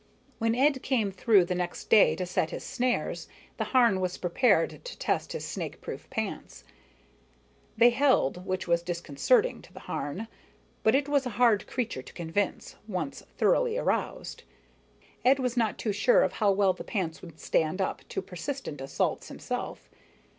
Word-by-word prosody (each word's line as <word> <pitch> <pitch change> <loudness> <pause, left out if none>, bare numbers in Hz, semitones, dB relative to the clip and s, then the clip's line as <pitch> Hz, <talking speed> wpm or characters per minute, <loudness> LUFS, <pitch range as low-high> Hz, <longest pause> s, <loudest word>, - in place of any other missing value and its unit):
When 230 0 +1
Ed 270 +1 +3
came 230 -7 0
through 195 -1 +4
the 180 - -2
next 180 -1 -4
day 215 - +6
to 185 - -3
set 175 -2 0
his - - -6
snares, 250 -1 -1 0.3
the - - -1
Harn 235 -7 +4
was 185 -1 -2
prepared 185 -1 +2
to - - -8
test - - -1
his 480 - -4
snakeproof - - -6
pants. - - -5 1.1
They 240 +2 +7
held, 240 - +2
which 185 0 -3
was 170 0 +2
disconcerting 170 - +1
to - - -17
the - - -11
Harn, 190 +10 -4 0.5
but 220 - +4
it 275 +1 +1
was 285 -2 +1
a 230 - -7
hard 235 -4 +4
creature 240 - -3
to - - -14
convince, 175 +4 -3
once 180 -9 -4 0.2
thoroughly 485 -1 +2
aroused. - - -2 0.8
Ed 260 +2 +5
was 250 -2 -1
not 225 -3 +1
too 215 - -1
sure - - +4
of - - 0
how 205 -3 +2
well 195 -1 +3
the - - -8
pants 175 -7 -3
would 165 -3 -12
stand 160 +4 0
up 190 - -1
to 190 - -3
persistent 185 - -6
assault 135 - -1
himself. - - -5
205 Hz, 165 wpm, -28 LUFS, 180-255 Hz, 1.1 s, They